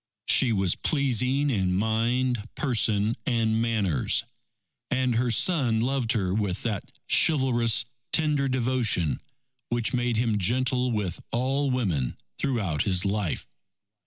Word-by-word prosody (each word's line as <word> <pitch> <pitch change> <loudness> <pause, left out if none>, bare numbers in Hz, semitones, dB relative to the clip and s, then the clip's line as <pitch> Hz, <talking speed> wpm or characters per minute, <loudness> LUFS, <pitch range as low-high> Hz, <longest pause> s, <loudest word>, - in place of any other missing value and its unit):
She 125 - +4
was 95 -4 +1
pleasing 135 0 +1
in 95 -5 0
mind, 115 +3 0
person, 110 -5 +1
and 115 -2 +1
manners. 105 - +1 0.7
And 130 -1 +1
her 120 +2 +1
son 120 - +2
loved 125 0 0
her 95 -6 0
with 100 -3 -2
that 110 -5 -3 0.2
chivalrous 120 -7 +3 0.3
tender 150 -4 +1
devotion, 120 - 0 0.5
which 120 -1 -1
made 120 -2 0
him 115 -3 +1
gentle 125 +5 +1
with 100 -6 -3
all 135 +4 0
women 90 - -1 0.2
throughout 100 - -1
his 90 -1 +1
life. 100 -4 -1
115 Hz, 120 wpm, -26 LUFS, 105-130 Hz, 0.7 s, She